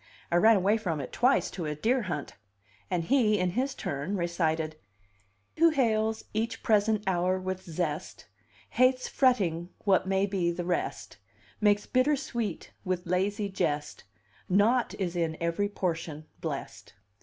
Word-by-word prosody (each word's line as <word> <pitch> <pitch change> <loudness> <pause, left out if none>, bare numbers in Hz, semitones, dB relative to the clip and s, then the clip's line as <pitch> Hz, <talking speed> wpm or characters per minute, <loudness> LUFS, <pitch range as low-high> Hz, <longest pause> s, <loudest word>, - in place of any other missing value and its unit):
I 170 - +4
ran 220 +5 +6
away 200 +3 +3
from 175 -8 -2
it 135 - -6
twice 255 +3 +2
to 170 -4 -4
a 150 - -2
deer 240 - +1
hunt." 155 -8 -4 0.6
And 175 -2 0
he, 220 -1 +3
in 180 -1 0
his 260 +7 -1
turn, 145 +8 -3
recited: 160 -3 -1 0.8
"Who 335 +1 +6
hails 220 -6 +1
each 225 +2 -2
present 215 -1 +2
hour 185 0 +1
with 185 0 -4
zest 160 -3 -4 0.5
Hates 255 0 +3
fretting 180 -10 +1
what 190 -2 +3
may 195 +1 +2
be 190 -4 0
the 175 0 -4
rest, 175 - -3 0.4
Makes 205 -1 +3
bitter 260 +4 +2
sweet 235 -6 -4
with 185 -2 -2
lazy 200 +4 0
jest; 150 -6 -2 0.4
Naught 220 +6 +3
is 180 -3 -3
in 165 -2 -1
every 170 +5 0
portion 165 -5 -3
blest." - - -6
190 Hz, 145 wpm, -29 LUFS, 170-220 Hz, 0.8 s, ran